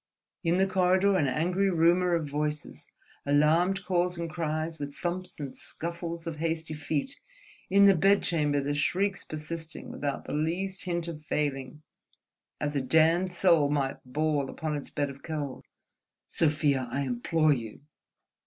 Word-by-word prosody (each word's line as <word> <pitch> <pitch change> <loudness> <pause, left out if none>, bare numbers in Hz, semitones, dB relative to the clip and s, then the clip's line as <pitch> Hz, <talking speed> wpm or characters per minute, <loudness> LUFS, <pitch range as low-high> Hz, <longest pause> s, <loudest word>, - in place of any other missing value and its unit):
In 170 +1 +2
the 190 - +4
corridor 190 +1 +3
an 155 -7 +2
angry 180 +8 +1
rumour 175 +1 +3
of 160 -3 -1
voices, 150 +1 -3 0.3
alarmed 165 +7 +3
calls 180 -1 +1
and 170 -1 -4
cries, 160 -1 -2
with 145 -1 -5
thumps 180 0 -4
and 140 -3 -5
scuffles 170 0 -5
of 165 -2 -4
hasty 160 0 -2
feet, 155 - -3 0.5
in 200 +1 +6
the 200 - +8
bedchamber 165 -6 +2
the 145 +1 -1
shrieks 185 +7 0
persisting 160 +1 -6
without 145 -1 -3
the - - -5
least 180 +6 -2
hint 170 -1 -2
of 160 -3 -6
failing: 150 -2 -3 0.8
as 145 -1 -2
a 140 - +1
damned 160 +7 +3
soul 170 -5 +4
might 140 -2 -1
bawl 145 +1 0
upon 155 -1 -3
its 145 - -6
bed 145 -1 -2
of 140 0 -14
coals... 150 -5 -5 0.6
"Sofia, 145 -5 +1
I 140 - -1
implore 145 +5 +2
you!" 115 -2 -6
160 Hz, 150 wpm, -28 LUFS, 145-175 Hz, 0.8 s, the